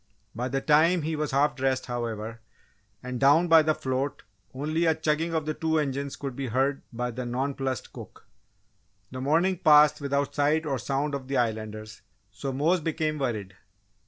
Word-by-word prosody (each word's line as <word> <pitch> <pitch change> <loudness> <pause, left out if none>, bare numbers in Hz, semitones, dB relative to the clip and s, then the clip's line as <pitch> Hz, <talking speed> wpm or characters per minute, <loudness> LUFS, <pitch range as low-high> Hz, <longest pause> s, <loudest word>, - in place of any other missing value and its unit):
By 125 +3 -3
the 135 +1 -2
time 160 +4 +4
he 160 +1 -2
was 150 -1 -2
half 140 +2 +2
dressed, 135 -1 0
however, 115 -2 -4 0.6
and 125 -1 -4
down 145 +6 +5
by 165 -1 +7
the 155 0 +1
float 130 +1 -3 0.3
only 155 +5 -1
a 160 -1 +3
chugging 160 +1 -1
of 155 -2 -1
the 155 - -1
two 160 +1 0
engines 140 -2 -2
could 135 -3 -6
be 135 0 -4
heard 135 +4 0
by 125 +1 -3
the 125 +2 -5
nonplussed 130 0 -3
cook. - - -11 0.9
The 130 0 -6
morning 165 +6 +2
passed 150 -2 +6
without 140 0 -1
sight 150 +2 +1
or 135 -4 -1
sound 140 +5 -2
of 135 -2 -4
the 135 - -1
Islanders 110 -2 -3 0.3
so 105 +7 -5
Mose 160 +7 +1
became 155 -1 -2
worried. 110 -8 -3
140 Hz, 175 wpm, -27 LUFS, 125-155 Hz, 0.9 s, by